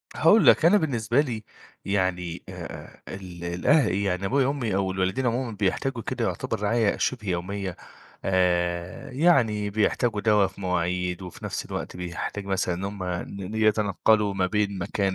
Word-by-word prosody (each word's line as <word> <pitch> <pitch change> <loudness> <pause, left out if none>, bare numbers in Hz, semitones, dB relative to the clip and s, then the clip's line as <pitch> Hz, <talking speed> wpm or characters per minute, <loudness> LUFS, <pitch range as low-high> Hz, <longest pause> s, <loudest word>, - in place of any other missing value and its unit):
هاقول 205 +8 +5
لك، 165 - +6
أنا 200 +5 +7
بالنسبة 125 - 0
لي 115 -7 -4 0.4
يعني 90 -3 -1
آآ - - -8 0.5
آآ - - -6
ال 90 -3 -9
الأه 90 - +3
يعني 95 0 -1
أبويا 130 +5 +2
وأمي 130 -8 -1
أو 95 -1 0
الوالدين 95 +7 -1
عمومًا 120 0 0
بيحتاجوا 120 +5 0
كده 125 -2 -2
يعتبر 115 -2 -2
رعاية 110 0 +2
شِبه 115 -5 -2
يوميّة. 95 +1 -3 0.5
آآ 90 -2 0
يعني 125 -9 +3
بيحتاجوا 110 +1 +1
دَوا 105 -2 +4
في 95 +1 -12
مواعيد 90 0 -1
وفي 90 -2 -9
نَفْس - - -3
الوقت - - -5
بيحتاج 90 +3 -5
مثلًا 95 -2 0
إن 95 +3 -5
هم 100 -2 -4
ن 90 +2 -5
ن 110 - -6
يتنقَّلوا 105 -1 +2
ما 95 -1 +1
بين 100 0 0
مكان 95 +2 -1
100 Hz, 160 wpm, -26 LUFS, 90-115 Hz, 0.5 s, أنا